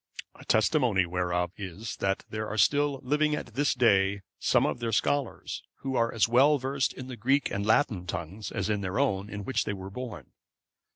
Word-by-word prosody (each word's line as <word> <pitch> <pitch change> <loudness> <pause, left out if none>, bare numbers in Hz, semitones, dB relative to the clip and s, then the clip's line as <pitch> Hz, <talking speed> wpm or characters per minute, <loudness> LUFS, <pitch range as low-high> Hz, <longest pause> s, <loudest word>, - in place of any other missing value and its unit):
A - - -15
testimony 110 - +3
whereof 90 0 -1
is, 100 +3 -6
that 95 0 -1
there 110 0 -4
are 110 - -4
still 145 +6 +2
living 150 +3 +2
at 120 - -7
this 145 +4 +1
day 100 -4 +3 0.2
some - - +3
of - - -1
their 115 -1 -2
scholars, 140 +4 -1 0.2
who 135 -1 -3
are 115 -1 +2
as 115 - +2
well 135 +6 +5
versed 135 +1 -1
in 130 - -8
the 130 -1 -7
Greek 135 +6 +1
and 100 0 -2
Latin 110 -6 +2
tongues 90 +5 -5
as - - -2
in 105 -2 0
their 95 +2 -3
own, 105 -8 0
in 105 0 -6
which 130 - 0
they 105 - -3
were 95 0 -7
born. 125 +1 -7
110 Hz, 195 wpm, -28 LUFS, 100-130 Hz, 0.2 s, well